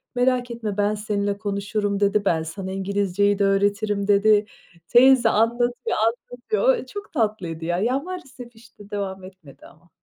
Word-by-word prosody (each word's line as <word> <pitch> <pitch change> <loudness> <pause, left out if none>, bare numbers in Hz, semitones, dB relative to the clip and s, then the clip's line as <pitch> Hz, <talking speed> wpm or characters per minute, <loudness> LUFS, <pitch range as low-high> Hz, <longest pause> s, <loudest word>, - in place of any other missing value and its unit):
"Merak 250 0 +1
etme 220 -4 -5
ben 205 +1 +1
seninle 205 -1 -2
konuşurum." 205 0 -2
dedi, 200 0 +1
"Ben 160 -4 +1
sana 190 +4 -6
İngilizceyi 200 +1 0
de 200 - +3
öğretirim." 200 +1 0
dedi. 210 +1 +4 0.4
Teyze 250 -1 +6
anlatıyor 240 +3 0
anlatıyor, 430 - 0
ooo, - - -8
çok 410 -2 -9
tatlıydı 210 - -2
ya. 175 +1 -1
Ya, 250 +6 +1
maalesef, 270 -9 -9
işte, 215 -3 -17
devam 195 -2 -4
etmedi 185 -7 -14
ama. 170 +2 -22
205 Hz, 150 wpm, -23 LUFS, 200-240 Hz, 0.4 s, Teyze